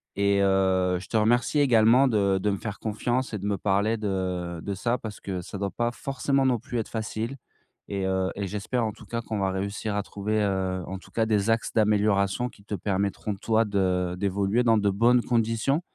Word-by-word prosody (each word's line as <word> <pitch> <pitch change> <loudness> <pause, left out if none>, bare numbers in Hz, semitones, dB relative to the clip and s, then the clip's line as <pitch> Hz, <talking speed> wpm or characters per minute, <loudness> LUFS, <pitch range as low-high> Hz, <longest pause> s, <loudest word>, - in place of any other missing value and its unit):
et 100 0 +2
heu, 95 -1 +2
je 90 - -11
te 110 - 0
remercie 120 +6 +2
également 125 0 +5
de 100 -4 +2
de 105 - +1
me 100 - 0
faire 105 -1 -6
confiance 120 +3 -2
et - - -1
de 100 - -6
me 100 -1 0
parler 100 +4 +1
de 90 -4 -2
de 100 - -3
ça. 120 +6 0
Parce 110 -3 -8
que 95 -2 -4
ça 100 - -7
doit 100 0 -2
pas 120 0 -1
forcément 135 +1 -1
non 125 -3 +2
plus 125 -2 -5
être 110 - -3
facile, 110 +3 -3 0.5
et 100 -2 -2
heu 95 0 0
et 100 -1 -3
j'espère 105 +5 -2
en 110 - -1
tout 110 - -14
cas 115 +2 -3
qu'on 110 -2 -4
va 95 -1 +1
réussir 100 +2 -3
à 105 - 0
trouver, 105 +2 -2
heu, 95 -2 -1
en 95 - -5
tout - - -16
cas. 115 -1 +1
Des 105 -1 +1
axes 115 0 0
d'amélioration 105 +1 +2
qui 100 - -19
te 105 - -4
permettront 100 +2 -2
toi 110 +2 +1
de 90 -3 0
d'évoluer 100 +4 +1
dans 115 -2 +4
de 100 -1 +2
bonnes 120 +5 +4
conditions. 115 +5 +1
105 Hz, 215 wpm, -26 LUFS, 95-115 Hz, 0.5 s, également